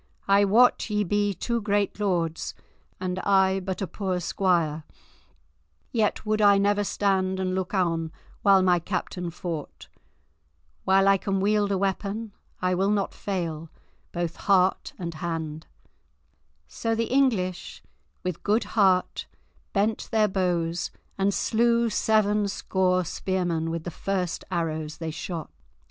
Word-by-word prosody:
I 200 +1 +5
wot 230 +4 +4
ye 210 0 +1
be 205 +1 0
two 235 +6 -2
great 205 0 0
lords, 170 -5 -1 0.4
and 185 0 -2
I 190 -1 +3
but 190 +1 -4
a - - 0
poor 185 0 -2
squire, 170 -4 0 1.1
yet 220 -2 0
would 215 0 +1
I 200 -1 +6
never 205 +1 +2
stand 190 -2 0
and 185 -1 -1
look 190 +1 -2
on 165 -3 0 0.3
while 195 -2 +5
my 180 -1 +4
captain 180 0 -3
fought. 160 - -6 1.0
While 195 +1 +4
I 195 0 +6
can 195 0 -1
wield 205 +1 +2
a 195 - +1
weapon, 200 +3 -2 0.3
I 180 0 +2
will 190 +2 +1
not 205 -1 0
fail, 165 -5 -4 0.4
both 170 -1 -3
heart 190 -2 +2
and 170 -2 -5
hand." 160 -1 -4 1.0
So 225 - -2
the 230 +2 -1
English 215 -10 0 0.4
with 180 -3 -3
good 215 +3 +2
heart 190 -4 +2 0.4
bent 215 +2 0
their 215 -1 +3
bows, 175 -3 -1 0.3
and 195 +1 +1
slew 235 +2 +2
seven 210 -1 +2
score 185 -2 0
spearmen 175 -2 -1
with 165 -1 -3
the 175 - -5
first 185 -1 -2
arrows 160 -3 -2
they 165 -1 -4
shot. 160 0 -6
190 Hz, 135 wpm, -26 LUFS, 175-205 Hz, 1.1 s, I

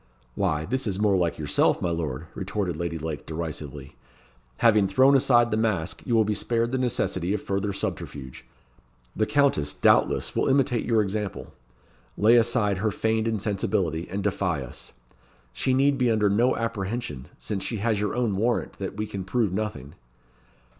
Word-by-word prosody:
"Why, 80 -4 0
this 130 +3 -2
is 95 -2 -1
more 105 -2 +3
like 85 -3 0
yourself, 75 -2 +2
my 85 - -1
lord," 80 -3 -3
retorted 95 -2 -3
Lady 85 0 -3
Lake, 80 -1 -5
derisively. 75 -3 -6 0.6
"Having 105 -4 +4
thrown 130 +8 +5
aside 120 -3 +4
the 110 - +1
mask, 105 -8 -1
you 120 - +2
will 110 -1 +4
be 105 - 0
spared 115 +3 0
the 130 - 0
necessity 105 -7 0
of 105 - -4
further 100 +1 -1
subterfuge. 65 -8 -5 0.7
The 110 - +1
Countess, 110 - +2
doubtless, - - +2
will - - +1
imitate 130 -3 +2
your 115 -2 +3
example, 100 0 -4 0.6
lay 110 +3 +5
aside 115 -4 +2
her 110 +2 +1
feigned 110 +1 0
insensibility, 100 -6 -1
and 100 +1 -3
defy 95 -7 -1
us. 65 - -8 0.6
She 130 - 0
need 135 +1 +3
be 125 -1 +3
under 105 -3 +2
no 120 +5 +3
apprehension; 110 - -3
since 100 -3 -4
she 115 - -2
has 105 0 0
your 105 0 -1
own 120 -5 0
warrant 115 +4 -1
that 95 0 -5
we 105 - -1
can 100 -2 -5
prove 105 0 0
nothing." 95 -9 -4
105 Hz, 165 wpm, -25 LUFS, 90-115 Hz, 0.7 s, thrown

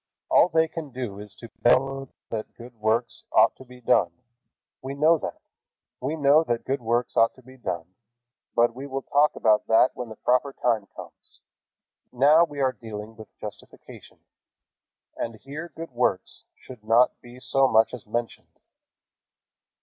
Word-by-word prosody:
All 175 - +6
they 160 -1 +3
can 160 -2 -7
do 125 -6 -6
is 105 0 -10
to 115 - -12
bellow 135 +3 +2 0.2
that 110 -1 -5
good 120 +1 -12
works 110 +2 -1
ought - - +5
to - - -12
be 125 -1 -15
done. 100 -6 +3 0.7
We 135 +1 -6
know 155 +3 +4
that. - - -6 0.6
We 140 +5 -2
know 150 +1 +4
that 120 -4 -2
good 135 0 -1
works 120 +1 -1
ought 115 0 +3
to 130 - -19
be 130 +2 -15
done, 90 -8 -5 0.6
but 120 0 +3
we 135 +3 -8
will 135 -1 -4
talk 145 +1 +2
about 110 -1 +2
that 115 +3 +5
when 125 -2 -6
the 110 - -9
proper 125 +4 +1
time 115 -6 0
comes. - - -13 0.7
Now 145 +6 +5
we 145 -3 -9
are 130 -1 +2
dealing 110 -2 -9
with 110 -1 -11
justification, - - -11 1.0
and 115 -1 -4
here 150 +9 -8
good 165 -2 -8
works 120 -6 -1
should 125 -5 -13
not 115 +3 +3
be 120 +1 -13
so 135 +1 +2
much 110 -1 +3
as 120 -4 -9
mentioned. 115 +2 -5
125 Hz, 165 wpm, -25 LUFS, 115-135 Hz, 1.0 s, All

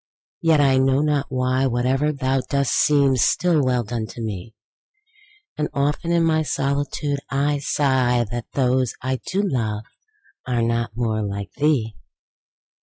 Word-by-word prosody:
—yet, 160 -2 +4
I 135 -2 +4
know 135 +1 +3
not 150 -2 0
why, 130 0 0
5 - - +2
Whate'er 130 +5 +1
thou 135 -2 0
dost 140 -2 +1
seems 140 -4 +3
still 165 +4 +2
well 125 -2 +1
done, 115 0 -4
to 95 - -11
me: 110 -1 -6 1.0
And 150 - 0
often 145 +4 0
in 170 -1 +3
my 160 -1 +2
solitude 140 0 -1
I 145 +1 0
sigh 130 -4 +1
That 120 -2 -4
those 130 -2 +1
I 130 0 -1
do 195 +9 -2
love 110 - -1 0.6
are 120 -2 0
not 115 -1 -1
more 110 -3 0
like 100 -2 -4
thee! 140 -8 0
130 Hz, 150 wpm, -22 LUFS, 120-145 Hz, 1.0 s, yet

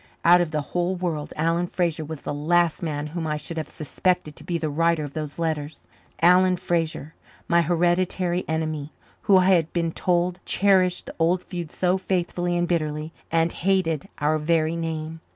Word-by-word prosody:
Out 175 +1 +7
of 175 - 0
the 155 -1 -1
whole 180 +1 0
world 170 -5 -3
Alan 165 +3 +1
Fraser 170 -3 -1
was 155 -1 -7
the - - -3
last 165 +3 +1
man 150 -3 -3
whom 160 +1 -4
I 150 0 -1
should 165 +2 -7
have 155 - -3
suspected 155 0 -1
to - - -12
be 175 - -2
the 160 -1 -2
writer 165 +1 +1
of 145 -1 -7
those 155 -2 -5
letters 155 -2 -3 0.4
Alan 180 +1 +6
Fraser, 165 -3 -2 0.3
my 170 0 +4
hereditary 175 +1 +1
enemy, 155 -2 -2 0.3
who, 200 -3 +5
I 185 0 +4
had 170 -4 +3
been 170 -2 0
told, 180 +1 0
cherished 185 -2 +2
the - - -8
old 175 +3 +2
feud 175 -4 -6
so 185 +1 +1
faithfully 175 -1 -1
and 175 0 +1
bitterly, 155 -2 -2 0.2
and 165 0 +2
hated 175 -5 0
our 155 +1 +1
very 160 +1 +1
name. 160 -1 -4
170 Hz, 180 wpm, -24 LUFS, 155-175 Hz, 0.4 s, Out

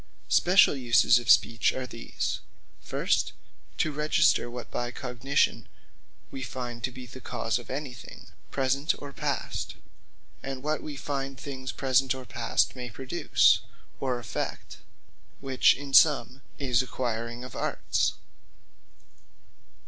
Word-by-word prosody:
Speciall 180 -5 +5
uses 120 0 +5
of 120 - -7
Speech 115 -3 +5
are 130 - -4
these; 115 -1 -4 0.4
First, - - 0 0.4
to 155 - +1
Register, 150 -4 +2
what 120 0 -8
by 120 0 -2
cogitation, 125 +2 0 0.6
wee 135 - -6
find 120 -2 -5
to 130 - +1
be 125 0 -9
the 130 +2 -11
cause 115 0 -2
of 120 - -13
any 135 -1 -4
thing, 90 -7 -12 0.2
present 140 +3 +1
or 140 -1 -8
past; - - -3 0.7
and 135 -1 -6
what 155 +1 -1
we 150 - -6
find 135 -1 -4
things 130 -2 -5
present 130 0 +2
or 130 -1 -8
past 115 +2 0
may 125 -1 -6
produce, 130 +9 +3 0.4
or 130 -2 -1
effect: 120 - -5 0.6
which 135 -2 +4
in 140 0 -8
summe, 140 -2 +5 0.2
is 130 -4 +2
acquiring 120 -1 -3
of 125 - -9
Arts. - - 0
130 Hz, 130 wpm, -28 LUFS, 120-135 Hz, 0.7 s, Speciall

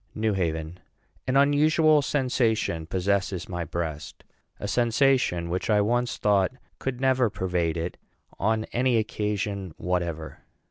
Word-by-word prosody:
NEW 110 -1 0
HAVEN 80 -2 -2 0.5
An 130 +1 +2
unusual 150 +2 +4
sensation 115 - 0
possesses 95 0 -1
my 90 -2 -3
breast 80 -2 -5 0.4
a 100 - -4
sensation 120 -5 +2
which 90 +5 -3
I 105 -1 +4
once 120 +4 +1
thought 100 0 +2 0.3
could 130 -2 -3
never 130 -3 +3
pervade 90 -4 -1
it 85 +2 -4 0.4
on 110 +2 +1
any 125 0 +2
occasion 105 -4 -2
whatever. 85 -3 -3
105 Hz, 125 wpm, -26 LUFS, 90-125 Hz, 0.5 s, unusual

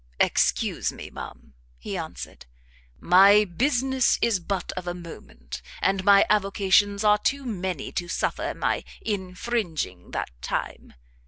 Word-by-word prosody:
"Excuse - - +1
me, - - -10
ma'am," 70 - -10 0.2
he - - -6
answered, - - -7 0.5
"My 200 +4 +6
business 260 - +1
is 230 -5 +2
but 185 +1 -3
of 180 -1 -7
a 175 - -2
moment, 65 - -10 0.2
and 195 -1 +1
my 200 0 +6
avocations 200 0 +2
are 210 0 +5
too 275 +5 -1
many 185 - -4
to 175 - -3
suffer 170 - -2
my - - -1 0.2
infringing 185 - -3
that - - -4
time. 65 - -4
195 Hz, 130 wpm, -25 LUFS, 175-210 Hz, 0.5 s, My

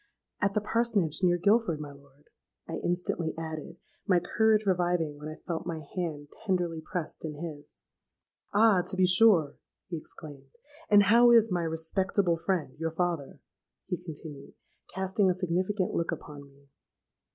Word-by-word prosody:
—'At 200 -1 +1
the 210 - +2
Parsonage, 210 -7 0
near 175 -1 +3
Guilford, 200 -2 +2
my 150 -1 -7
lord,' 140 0 -20 0.4
I - - -4
instantly 175 -2 -1
added, 160 +1 -6 0.3
my 185 -3 +4
courage 215 +4 +2
reviving 175 -5 0
when 150 - -7
I 155 - -7
felt 170 -1 -4
my 165 -2 -4
hand 155 -5 -4
tenderly 175 -5 -1
pressed 160 +1 -5
in 155 -2 -5
his.—'Ah! 170 +6 -2
to 190 +2 -6
be 185 - +5
sure,' 180 -6 +4 0.3
he 170 - -3
exclaimed; 145 -3 -11 0.4
'and 205 -1 +7
how 235 +4 +6
is 230 -2 +5
my 175 -1 +1
respectable 170 +3 0
friend, 165 -5 -2
your 165 0 -1
father?' 165 -3 -3 0.4
he 180 -1 -4
continued, 150 -4 -9 0.4
casting 190 +1 +1
a 180 - +1
significant 185 +2 -1
look 170 - -1
upon 150 -3 -8
me. 140 0 -24
175 Hz, 150 wpm, -29 LUFS, 155-190 Hz, 0.4 s, and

